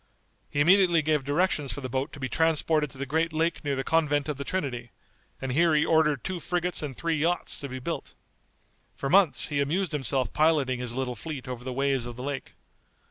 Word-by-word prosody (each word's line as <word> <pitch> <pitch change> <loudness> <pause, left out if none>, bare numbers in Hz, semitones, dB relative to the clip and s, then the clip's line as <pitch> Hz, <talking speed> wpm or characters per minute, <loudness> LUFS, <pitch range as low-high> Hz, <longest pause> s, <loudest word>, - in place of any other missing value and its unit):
He 145 - 0
immediately 175 0 +5
gave 150 -2 +1
directions 145 -1 0
for 145 - -5
the 130 - -4
boat 130 +3 -2
to 145 - -9
be 130 - -2
transported 160 -1 +2
to 130 - -13
the 140 - -3
great 160 +4 0
lake 165 +2 -1
near 140 -2 -1
the 135 - -2
convent 145 -3 +1
of 150 -3 -3
the 140 - -4
Trinity, 135 -9 -3 0.5
and 135 -1 -3
here 165 +3 +3
he 150 - +3
ordered 150 -4 +2
two 185 -2 -3
frigates 175 +1 -2
and 140 -4 -5
three 165 -1 0
yachts 170 +3 0
to 140 - -6
be 130 - -5
built. 160 +6 -5 0.8
For 135 - -3
months 180 -10 +5
he 145 -2 0
amused 170 +7 0
himself 135 -3 -1
piloting 150 -5 +2
his 120 -1 -4
little 130 -1 -2
fleet 140 +1 -7
over 125 -1 -6
the 130 - -4
waves 135 -1 0
of 120 - -7
the 125 - -7
lake. 140 -1 -5
145 Hz, 215 wpm, -27 LUFS, 130-165 Hz, 0.8 s, immediately